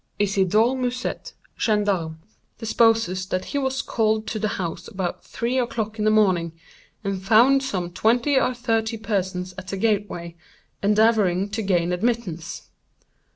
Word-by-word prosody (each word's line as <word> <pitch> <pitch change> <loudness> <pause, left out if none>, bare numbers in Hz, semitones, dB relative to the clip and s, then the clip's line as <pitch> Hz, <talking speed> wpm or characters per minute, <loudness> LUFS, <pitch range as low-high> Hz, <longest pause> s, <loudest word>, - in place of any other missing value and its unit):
"Isidore 205 +4 +2
Musèt, 250 0 -3 0.3
gendarme, 200 -7 0 0.4
deposes 225 -5 +2
that 185 -1 -2
he 285 - -2
was 265 -1 -1
called 220 -1 0
to 220 0 -3
the 215 - 0
house 170 -2 -4
about 185 -5 -4
three 245 +3 -2
o'clock 220 -3 -3
in 210 - 0
the - - +5
morning, 185 -6 +2 0.5
and 195 -2 -2
found 235 +7 +5
some 185 -10 -3
twenty 240 +9 +2
or 255 -1 +2
thirty 225 -1 -1
persons 185 -4 -2
at 185 - -10
the 195 - -4
gateway, 195 -5 -1 0.5
endeavoring 205 -2 +3
to 220 +2 -3
gain 180 -3 +1
admittance. 180 -5 -2
215 Hz, 140 wpm, -23 LUFS, 185-230 Hz, 0.5 s, the